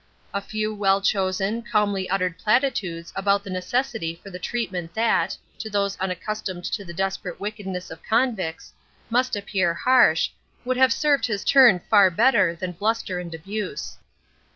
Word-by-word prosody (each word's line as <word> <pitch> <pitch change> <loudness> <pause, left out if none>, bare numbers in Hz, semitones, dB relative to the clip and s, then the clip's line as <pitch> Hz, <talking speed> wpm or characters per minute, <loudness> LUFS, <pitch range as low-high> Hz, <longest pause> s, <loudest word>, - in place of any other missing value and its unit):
A 200 - -1
few 215 +1 -3
well 195 -2 +2
chosen, 195 +2 0
calmly 205 -5 0
uttered 185 -2 -1
platitudes 210 -8 0
anent 200 +1 +1
the 200 - -7
necessity 185 -2 -2
for 195 - -10
the 180 - -7
treatment 185 -7 -4
that, 230 +1 +1 0.2
to 220 - -5
those 200 -1 0
unaccustomed 185 0 -4
to 205 - -2
the 170 - -9
desperate 190 0 -3
wickedness 200 -3 -5
of 160 0 -9
convicts, 220 -9 -1 0.4
must 250 +1 +2
appear 190 -4 0
harsh, 235 -6 +4 0.4
would 255 0 0
have 260 -1 +5
served 290 +1 +2
his 205 -3 -2
turn 245 -10 +6
far 200 -3 +6
better 175 -2 +3
than 180 +1 -4
bluster 200 0 -1
and 170 -2 -6
abuse. 205 - -5
200 Hz, 150 wpm, -24 LUFS, 180-225 Hz, 0.4 s, turn